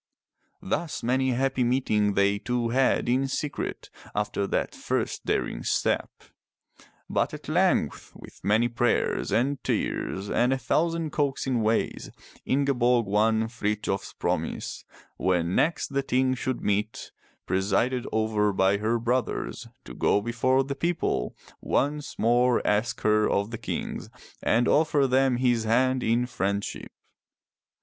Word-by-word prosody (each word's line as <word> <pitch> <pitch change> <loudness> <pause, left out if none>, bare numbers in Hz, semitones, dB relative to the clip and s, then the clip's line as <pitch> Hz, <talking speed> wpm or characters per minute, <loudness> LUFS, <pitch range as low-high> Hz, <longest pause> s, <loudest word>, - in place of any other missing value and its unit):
Thus 160 - -2
many 130 +2 +1
a 125 - +1
happy 135 0 +1
meeting 110 -5 +1
they 100 +1 +2
two 120 +1 -1
had 130 +2 +2
in 130 +3 +2
secret 145 +2 -4 0.2
after 100 -1 -1
that - - -1
first - - -3
daring - - -1
step. - - 0 1.0
But - - 0
at - - -11
length, - - +1
with - - -14
many 110 +4 +3
prayers 120 0 0
and 135 +3 0
tears 95 +1 -2
and 120 +4 +2
a 135 - +2
thousand 165 +3 0
coaxing 135 -4 0
ways, 110 +1 0 0.4
Ingeborg 125 -3 +2
won 110 +2 +2
Frithjof's 105 -3 -2
promise, - - -3 0.3
when 90 -1 +1
next 160 - +1
the 140 -1 0
Ting 130 0 +1
should 130 0 -3
meet 105 +2 -2 0.3
presided 100 +7 0
over 110 -1 +1
by 95 +1 +2
her 110 +3 0
brothers, 120 +2 -2 0.2
to - - -9
go - - +2
before 120 +4 +1
the 140 +1 -4
people, 170 +4 -1 0.3
once 145 +2 -1
more 120 +2 +3
ask 110 +4 0
her 105 0 +3
of 100 +3 0
the 115 - -5
kings, 115 - -4 0.3
and 120 +2 +2
offer 150 -2 +3
them 130 -1 +3
his 120 -3 +1
hand 130 +3 +2
in 120 +1 +1
friendship. 100 -5 -3
120 Hz, 135 wpm, -26 LUFS, 105-130 Hz, 1.0 s, many